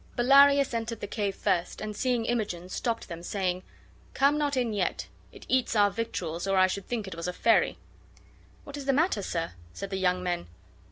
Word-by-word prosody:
Bellarius 275 +2 +6
entered 230 -1 -3
the - - -4
cave 205 -1 -2
first, 175 -1 -1
and, 215 -1 -5
seeing 245 0 0
Imogen, 205 -7 -2
stopped 230 +4 -2
them, 170 -2 -7
saying: 185 0 -2 0.3
" - - -28
Come 280 +2 +4
not 290 -2 0
in 240 -3 0
yet. 195 -3 -1 0.2
It - - -13
eats 255 -3 +1
our 205 -1 +4
victuals, 180 -7 -3
or 195 0 +2
I 185 - +7
should 190 +1 -3
think 225 -5 -3
it 190 - -6
was 170 +1 -5
a 180 - -2
fairy." 230 +5 +3 0.9
"What 285 0 -8
is 280 - -6
the 275 - +2
matter, 300 - +2
sir?" 165 -3 -3 0.2
said 195 0 -6
the 190 - -1
young 180 -1 +1
men. 175 - -2
210 Hz, 205 wpm, -28 LUFS, 185-245 Hz, 0.9 s, I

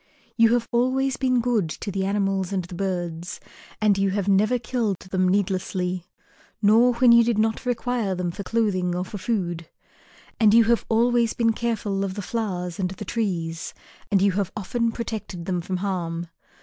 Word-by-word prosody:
You 230 0 +5
have 235 -1 +1
always 260 +2 +1
been 255 -2 +2
good 230 -8 +1
to 200 - -5
the 190 0 -1
animals 195 -2 0
and 185 -3 -1
the 180 - -11
birds, 175 -2 -3 0.4
and 205 -2 +3
you 195 0 +2
have 195 0 -1
never 210 +5 +3
killed 230 -4 -1
them 185 0 0
needlessly, 185 -2 -1 0.5
nor 230 +4 +5
when 245 0 +5
you 235 0 +7
did 230 -2 +1
not 220 +3 0
require 240 -4 -1
them 180 -1 -2
for 185 - -7
clothing 190 -4 0
or 180 +1 -2
for 205 +2 -7
food. 175 -5 -2 0.7
And 215 -1 +5
you 230 - +7
have 235 +1 +1
always 235 0 +2
been 230 -1 +2
careful 215 -4 -1
of 190 -1 -3
the 205 - -4
flowers 185 -5 -3
and 185 -2 0
the 190 +3 -7
trees, 175 -7 -3 0.4
and 195 -2 +3
you 200 - +4
have 195 0 -1
often 230 +3 -1
protected 215 -7 -5
them 180 -1 -1
from 185 +2 -3
harm. 175 -3 -3
200 Hz, 180 wpm, -24 LUFS, 185-230 Hz, 0.7 s, you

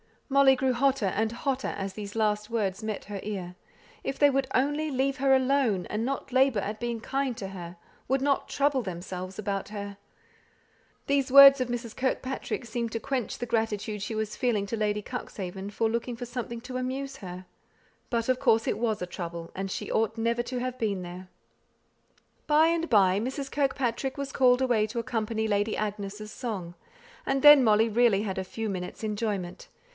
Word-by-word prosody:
Molly 275 -1 +6
grew 260 0 +1
hotter 260 -3 +2
and 220 +4 0
hotter 265 +2 -2
as 195 -1 -4
these 205 0 -7
last 210 -1 0
words 205 -4 -1
met 215 -2 -4
her 205 -1 -6
ear. 185 -4 -5 0.5
If 270 - -3
they 290 - +6
would 270 -1 0
only 290 +4 +1
leave 270 0 0
her 270 0 +4
alone, 260 -8 +2
and 215 +2 -2
not 275 0 -3
labour 260 -4 +3
at 210 +2 -4
being 235 -2 -3
kind 270 0 -1
to 195 - -5
her; 175 -2 -8 0.3
would 265 +1 +1
"not 280 0 +1
trouble 280 -2 +1
themselves" 185 -1 -6
about 200 -2 -3
her! 200 -1 -6 1.1
These 275 -2 +1
words 275 0 +10
of 255 - 0
Mrs. 240 -2 -4
Kirkpatrick's 260 -2 -2
seemed 235 -2 -3
to 230 - -1
quench 255 0 -3
the 245 - -3
gratitude 220 -2 -1
she 215 +3 -4
was 215 -1 -3
feeling 225 -5 +1
to 230 - -3
Lady 210 -1 0
Cuxhaven 195 -5 -6
for 220 +2 0
looking 235 +2 -2
for 245 +1 -6
something 235 -1 -5
to 255 +1 -6
amuse 265 +2 -3
her. 185 -4 -8 0.6
But, 230 -1 -1
of 255 0 +2
course, 225 -4 +3
it - - 0
was 220 -4 0
a - - -1
trouble, 170 -2 -6
and 195 +1 -4
she - - -4
ought 220 0 0
never 235 +1 +1
to 250 +1 -4
have 255 0 -4
been 205 -4 -1
there. 180 +1 -8 1.2
By 310 +1 +5
and 335 0 0
by, 195 -4 +4
Mrs. 265 +4 -4
Kirkpatrick 270 -2 -1
was 280 -1 -4
called 250 -1 +4
away 235 -5 +2
to 225 +3 -7
accompany 220 -1 -1
Lady 205 +1 +1
Agnes' 210 0 -4
song; 200 -10 -5 0.5
and 270 0 0
then 295 -2 +10
Molly 220 0 +4
really 220 -2 +3
had 190 -3 -3
a 190 - -3
few 225 +4 -4
minutes' 185 +2 -5
enjoyment. 205 -4 -3
230 Hz, 185 wpm, -28 LUFS, 205-260 Hz, 1.2 s, words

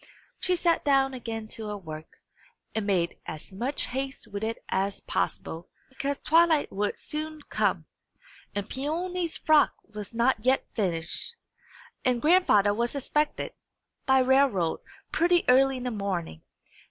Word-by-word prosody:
She 365 - +1
sat 340 -1 +2
down 270 -1 +3
again 225 -3 -5
to 220 -1 -5
her 210 0 -3
work, 155 -4 -9 0.6
and 215 -2 -2
made 175 -4 +1
as 155 +5 -7
much 250 +9 -1
haste 265 -2 -4
with 205 0 -5
it 225 +1 -1
as 195 +1 -1
possible; 165 +1 -3 0.2
because 275 +1 -3
twilight 325 -1 +4
would 205 +1 -1
soon 310 0 -4
come, - - +1 0.7
and 205 0 -2
Peony's 335 +6 -2
frock 310 -2 +4
was 210 -1 -8
not 235 -1 +2
yet 260 +2 +3
finished, 175 - -2 0.7
and 250 -2 +2
grandfather 295 - +5
was 235 +5 -1
expected, 300 +2 -1 0.5
by 265 0 +5
railroad, 255 -10 +3 0.3
pretty 345 +1 +3
early 265 +1 +5
in 250 - -6
the 250 - -2
morning. 190 - -3
250 Hz, 140 wpm, -27 LUFS, 205-290 Hz, 0.7 s, grandfather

